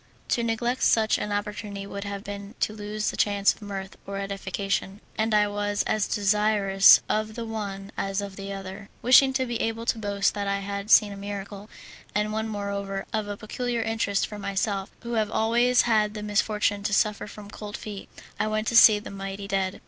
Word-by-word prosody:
To 235 - +1
neglect 235 +2 -1
such 220 -1 +3
an 210 - -3
opportunity 205 -1 -4
would 200 0 -6
have 200 0 -5
been 200 0 -7
to 215 - +1
lose 210 0 -3
the - - -7
chance 200 -1 +3
of - - -20
mirth 195 -2 -6
or 200 0 -4
edification, 195 0 -3 0.2
and 220 +1 0
I 210 -1 +4
was 205 0 -1
as 215 -2 0
desirous 205 -1 +5
of 215 0 -1
the 235 - -4
one 200 -3 -5
as 195 0 -2
of 200 -1 -5
the 195 0 -6
other. 195 +1 -7
Wishing 260 +2 +7
to 260 0 +1
be 240 -2 -3
able 225 +1 -2
to 230 - 0
boast 200 -1 0
that 200 -1 -3
I 200 0 0
had 200 +1 -5
seen 210 -3 +6
a - - -9
miracle 200 +1 -7 0.5
and 210 0 0
one, 220 +1 -1
moreover, 200 -1 -3
of 215 -2 -1
a 205 0 -5
peculiar 235 +2 -3
interest 220 -3 0
for 210 - -8
myself, 200 0 -2
who 235 0 -4
have 215 -2 +1
always 240 +3 +3
had 215 -2 +2
the 210 - -5
misfortune 210 0 +1
to 205 0 0
suffer 210 0 +1
from 205 0 -11
cold 210 -1 -7
feet 205 -2 -8 0.3
I 215 - +1
went 215 0 -1
to 235 - -2
see 220 -2 +9
the 205 - -8
mighty 195 0 -6
dead. 190 -1 -1
205 Hz, 200 wpm, -26 LUFS, 200-215 Hz, 0.5 s, see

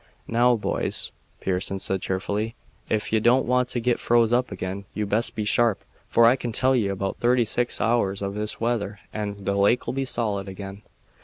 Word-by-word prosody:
"Now, 120 +1 +4
boys," 110 - -1 0.3
Pearson 95 +1 -2
said 95 -1 -1
cheerfully, 105 +4 -2 0.3
"ef 110 0 -1
ye 110 - +4
don't 120 +4 +4
want 125 0 +2
to 120 - -1
git 120 +1 +1
froze 120 -1 +3
up 125 -1 +1
again 95 +1 -5
you'd 105 -1 -2
best 110 +3 0
be 105 - -2
sharp, 115 -1 +2 0.2
for 115 - +5
I 120 +2 +6
can 120 -3 -4
tell 130 +4 +2
ye 110 -5 +2
about 95 0 -2
thirty 120 0 +3
six 120 +2 -1
hours 100 -4 +1
of 100 0 -2
this 105 +1 -3
weather 110 -3 -1 0.2
and 100 -2 -4
the 100 - +1
lake'll 100 +5 +2
be 135 0 -1
solid 105 -6 -1
again." 95 +1 -8
110 Hz, 190 wpm, -25 LUFS, 100-120 Hz, 0.3 s, I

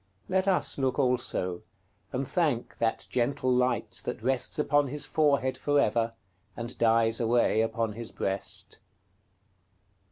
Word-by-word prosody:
Let 190 +1 +1
us 185 -6 +1
look 130 -2 0
also, 120 -9 0 0.5
and 130 +1 -2
thank 150 -10 -1
that 115 -1 0
gentle 130 +1 +1
light 125 0 0
that - - -5
rests 130 +4 0
upon 145 -1 +2
his 145 +2 -2
forehead 140 -4 +1
for 145 0 +2
ever, 115 -1 +1 0.4
and 120 0 -5
dies 115 0 +3
away 115 -1 +3
upon 115 -1 -1
his 115 +1 -7
breast. 100 +1 -3
125 Hz, 130 wpm, -28 LUFS, 115-140 Hz, 0.5 s, dies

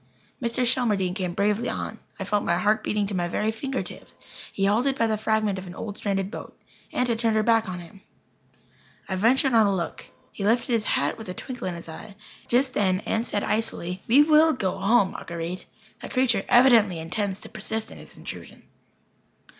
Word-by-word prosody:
Mr. 240 +1 0
Shelmardine 210 -7 +1
came 180 -3 -3
bravely 210 +4 +1
on. 220 - -4 0.2
I - - -2
felt 205 +1 0
my 170 0 +1
heart 210 +4 +2
beating 210 -1 0
to 200 - -4
my 175 -2 0
very 210 +5 0
finger 265 +4 -3
tips. - - -11 0.4
He 195 - 0
halted 245 +7 +2
by 230 - +2
the 220 -1 +1
fragment 215 -2 0
of 185 - -9
an 175 - -9
old 205 0 -6
stranded 195 -1 -2
boat. - - -9 0.3
Aunt 250 - 0
had 230 -2 0
turned 225 -2 +2
her 215 - +3
back 225 -2 +3
on 180 - -4
him. 175 +3 -12 1.1
I 190 - -2
ventured 250 +6 +3
on 220 -2 +6
a 200 - +1
look. 170 -3 -4 0.2
He 200 - -6
lifted 230 +4 +2
his 225 -2 +1
hat - - +1
with 220 - -8
a 180 - -5
twinkle 245 -3 -6
in 180 - -3
his 170 - -9
eye. 195 +6 -9 0.3
Just 260 +2 +2
then 190 -2 +1
Aunt 225 +2 -1
said, 205 - -1
icily: 210 -5 -1
"We 270 +6 +7
will 310 +1 +5
go 195 -5 -2
home, 195 0 +3
Marguer_ite_. 170 +2 -5 0.4
That - - -8
creature 255 -2 +2
evidently 235 -7 +6
intends 190 +4 -2
to - - -10
persist 220 +1 -4
in - - -11
his - - -13
intrusion." - - -9
210 Hz, 200 wpm, -25 LUFS, 190-230 Hz, 1.1 s, We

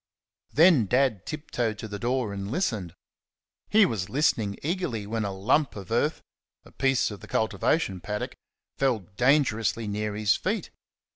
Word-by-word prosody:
Then 155 - +5
Dad 125 -5 +1
tiptoed 120 -8 -2
to 110 - -6
the 105 -1 -6
door 120 -3 -1
and 100 0 -5
listened. 110 - -2 0.7
He 215 -1 +6
was 105 - -2
listening 115 -8 +1
eagerly 150 - -2
when 110 +1 -2
a 100 - -2
lump 120 +9 +1
of 100 0 -9
earth 145 +7 +1 0.4
a - - -16
piece 135 -4 +1
of 100 - -8
the - - -12
cultivation 110 - 0
paddock 105 +2 -4 0.5
fell 130 -6 +2
dangerously 115 -4 +2
near 105 0 -2
his 105 -1 +3
feet. - - -2
115 Hz, 150 wpm, -27 LUFS, 105-135 Hz, 0.7 s, He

